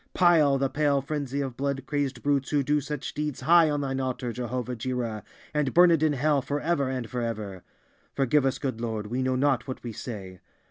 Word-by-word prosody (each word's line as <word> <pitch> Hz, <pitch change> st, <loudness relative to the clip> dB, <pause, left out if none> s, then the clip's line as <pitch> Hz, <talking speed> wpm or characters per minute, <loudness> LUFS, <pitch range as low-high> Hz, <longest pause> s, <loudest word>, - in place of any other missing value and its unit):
Pile 160 Hz, -6 st, +5 dB
the 135 Hz, 0 st, +1 dB
pale 145 Hz, 0 st, +1 dB
frenzy 140 Hz, -1 st, -3 dB
of 135 Hz, -3 st, -4 dB
blood 135 Hz, +1 st, -2 dB
crazed 140 Hz, -2 st, -2 dB
brutes 140 Hz, -2 st, +1 dB
who 145 Hz, -2 st, +2 dB
do 150 Hz, +2 st, +1 dB
such 150 Hz, 0 st, -5 dB
deeds 150 Hz, -2 st, -3 dB
high 170 Hz, -1 st, +6 dB
on 145 Hz, -1 st, 0 dB
Thine 135 Hz, -1 st, -2 dB
altar, 130 Hz, -2 st, -2 dB
Jehovah 125 Hz, +1 st, -3 dB
Jireh, 115 Hz, -2 st, -3 dB, 0.3 s
and 150 Hz, -3 st, 0 dB
burn 175 Hz, 0 st, +7 dB
it 165 Hz, -2 st, +3 dB
in 155 Hz, -1 st, +3 dB
hell 145 Hz, +1 st, +2 dB
forever 145 Hz, 0 st, -1 dB
and 130 Hz, -3 st, -3 dB
forever! 110 Hz, -5 st, -4 dB, 0.5 s
Forgive 140 Hz, +1 st, +3 dB
us, 135 Hz, -, 0 dB
good 130 Hz, -5 st, -3 dB
Lord; 110 Hz, -3 st, -3 dB
we 120 Hz, +5 st, -2 dB
know 130 Hz, 0 st, +1 dB
not 135 Hz, -2 st, +1 dB
what 130 Hz, -, -6 dB
we 120 Hz, -, -4 dB
say! 95 Hz, -6 st, -7 dB
135 Hz, 200 wpm, -27 LUFS, 125-145 Hz, 0.5 s, burn